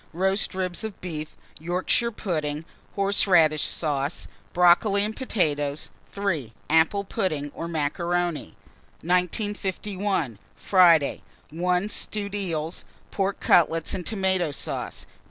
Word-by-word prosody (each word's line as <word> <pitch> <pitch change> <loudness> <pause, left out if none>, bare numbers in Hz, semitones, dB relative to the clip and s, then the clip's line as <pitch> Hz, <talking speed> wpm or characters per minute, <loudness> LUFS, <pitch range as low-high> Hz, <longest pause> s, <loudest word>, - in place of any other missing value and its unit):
Roast 190 +3 +1
ribs 185 +1 -2
of 220 -3 -6
beef, 155 -4 -6 0.2
Yorkshire 180 +8 0
pudding, 155 -7 -3 0.3
horseradish 185 -6 +3
sauce, 145 -1 -2 0.2
brocoli 180 +3 +4
and 215 +1 -4
potatoes. 150 - -1 0.2
3. 170 - -2 0.2
Apple 160 +5 +3
pudding 170 -9 -2
or 165 - -5
macaroni. 170 - -1 0.5
1951. 190 - -1 0.2
Friday. 170 -6 +4 0.3
1. 180 +4 0
Stewed 205 -1 -3
eels, 170 -5 -3 0.3
pork 195 0 -1
cutlets 165 -1 +3
and 180 - -3
tomato 190 -4 0
sauce. 140 - -4
180 Hz, 100 wpm, -25 LUFS, 155-195 Hz, 0.5 s, brocoli